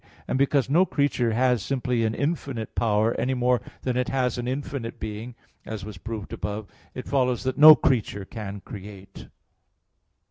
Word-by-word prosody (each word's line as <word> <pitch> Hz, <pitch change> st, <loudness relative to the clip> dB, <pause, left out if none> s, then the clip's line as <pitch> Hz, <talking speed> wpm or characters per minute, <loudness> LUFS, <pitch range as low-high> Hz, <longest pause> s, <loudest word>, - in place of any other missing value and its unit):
And 130 Hz, -, -1 dB
because 140 Hz, -1 st, +2 dB
no 160 Hz, +7 st, +4 dB
creature 140 Hz, -8 st, 0 dB
has 125 Hz, -1 st, +2 dB
simply 125 Hz, -2 st, -1 dB
an 110 Hz, 0 st, 0 dB
infinite 140 Hz, -7 st, -3 dB
power, 110 Hz, 0 st, +2 dB
any 130 Hz, +1 st, 0 dB
more 125 Hz, 0 st, +2 dB, 0.2 s
than 125 Hz, -1 st, -1 dB
it 125 Hz, 0 st, 0 dB
has 125 Hz, -2 st, 0 dB
an 120 Hz, -, -3 dB
infinite 130 Hz, -2 st, -4 dB
being, 110 Hz, +3 st, -6 dB, 0.3 s
as 110 Hz, -3 st, -6 dB
was 105 Hz, -3 st, -9 dB
proved 110 Hz, -2 st, -6 dB
above 105 Hz, +1 st, -4 dB
(Q. 95 Hz, -, -28 dB
7, -, -, -28 dB
A. -, -, -30 dB
2), -, -, -5 dB
it -, -, -8 dB
follows 125 Hz, -3 st, +1 dB
that 130 Hz, 0 st, -2 dB
no 155 Hz, +1 st, +11 dB
creature 105 Hz, -8 st, 0 dB
can 100 Hz, -2 st, -7 dB
create. 100 Hz, -, -10 dB
120 Hz, 185 wpm, -25 LUFS, 110-130 Hz, 0.3 s, no